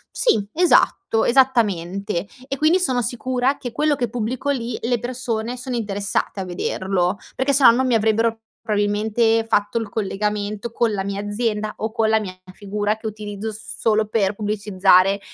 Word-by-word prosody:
Sì, 215 - +2
esatto. 355 -5 +3
Esattamente. 200 -7 +1 0.2
E, 275 - -3
quindi, 315 +6 +3
sono 260 -9 +1
sicura 250 +3 -1
che 255 -4 -6
quello 300 +5 +1
che 245 -4 -2
pubblico 245 +4 -3
lì, 240 -4 -3
le 240 0 0
persone 240 -1 -3
sono 250 0 -4
interessate 205 -2 -2
a 190 - -3
vederlo, 185 +1 -1 0.2
perché 265 +2 +1
se 275 +1 +3
no 235 - +10
non 260 +3 +1
mi 245 - +2
avrebbero 225 +1 +1 0.2
probabilmente 220 +1 +1
fatto 205 +1 +1
il 225 -2 -5
collegamento 210 +1 -2
con 235 -1 +1
la 195 -2 -2
mia 200 0 -3
azienda, 210 0 -2
o 220 0 -3
con 225 0 +1
la 220 0 +4
mia 190 -4 -6 0.2
figura, 205 +1 -2
che 220 - -6
utilizzo 210 0 -5
s 215 +1 -9
solo 220 -1 +2
per 205 -2 0
pubblicizzare 200 -2 +3
220 Hz, 170 wpm, -21 LUFS, 205-245 Hz, 0.2 s, no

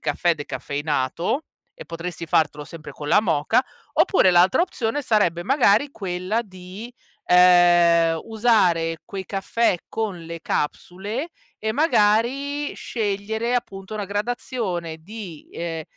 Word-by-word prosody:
caffè 175 -1 +1
decaffeinato 145 - -2 0.3
e - - -9
potresti 170 0 -6
fartelo 150 -2 +1
sempre 155 -2 -10
con 145 +1 -7
la 185 - +5
moka, 165 - +2 0.3
oppure 280 - +4
l'altra 180 - +4
opzione 290 -6 -2
sarebbe 180 -8 +1
magari 265 0 +3
quella 185 -1 -2
di, 190 +4 -10 0.3
ehm, 175 -2 +5
usare 185 -8 +2
quei 195 -1 -6
caffè 195 0 0
con 210 -6 -3
le 165 0 -7
capsule 200 - -3 0.3
e 220 0 -2
magari 275 +2 +1
scegliere, 220 +2 -2
appunto, 195 -4 -6
una 210 -1 -3
gradazione 205 -5 -3
di, 185 -3 -10
ehm, 165 -1 -4
190 Hz, 115 wpm, -23 LUFS, 170-225 Hz, 0.3 s, la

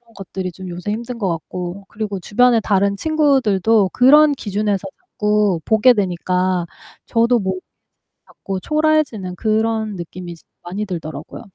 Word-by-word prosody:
것들이 190 -1 -5
좀 185 +2 -10
요새 180 +4 -5
힘든 235 +2 -5
것 195 -4 0
같고 175 +3 -5
그리고 205 -2 -4
주변에 235 +6 +3
다른 200 -1 +1
친구들도 225 - +2
그런 295 +4 +6
기준에서 205 -5 -2
자꾸 210 -4 0
보게 220 +3 +5
되니까 185 -2 0 0.4
저도 235 +1 +2
뭐 190 -2 -1 0.7
자꾸 195 -1 -6
초라해지는 305 -10 0
그런 220 +1 0
느낌이 175 0 -7
이제 165 - -17 0.2
많이 190 +5 -4
들더라고요. 160 -6 -7
205 Hz, 310 characters per minute, -19 LUFS, 185-225 Hz, 0.7 s, 그런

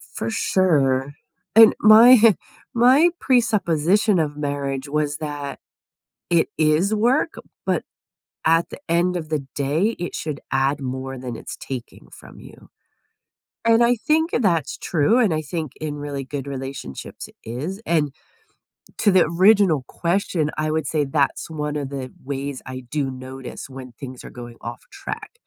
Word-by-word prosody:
For 115 - -3
sure. 140 - +1 0.4
And 225 -1 +9
my, 220 +4 +9
huh, 230 -2 +7 0.4
my 260 +8 +5
presupposition 210 - +2
of 150 -2 -1
marriage 140 -1 -3
was 150 0 -1
that, 145 -2 -5 0.7
it 170 -2 +3
is 160 +7 +2
work, 250 +9 +2 0.3
but - - 0 0.6
at 165 +1 +3
the - - -9
end 175 +2 +1
of 155 -3 -5
the 145 -4 -2
day, 155 +11 0
it 175 - -5
should 150 -2 -4
add 135 +2 +1
more 130 +1 -4
than 125 -2 -6
it's - - -8
taking 130 -3 -8
from - - -14
you. - - -15 1.0
And 230 0 +4
I 240 +1 +4
think 315 +7 +1
that's 175 - +1
true, 170 +8 +2
and 220 -10 +3
I 155 - -1
think 155 -2 -4
in 150 -1 -4
really 145 -2 -5
good 140 0 -5
relationships 135 - -7
it - - -21
is, 145 - -5
and 150 -4 +1 0.9
to 205 - +4
the 185 -1 +5
original 180 -3 +4
question, 170 -3 -1
I 155 0 0
would 155 -3 -1
say 155 -2 +1
that's 140 +2 0
one 150 -1 -3
of 145 -2 -3
the 135 -2 -6
ways 140 0 -4
I 130 -1 -7
do 140 -2 -1
notice 130 +1 -8
when 130 -1 -9
things 125 +1 -10
are - - -9
going 120 -1 -10
off 120 0 -7
track. 395 -1 -7
150 Hz, 155 wpm, -22 LUFS, 135-190 Hz, 1.0 s, And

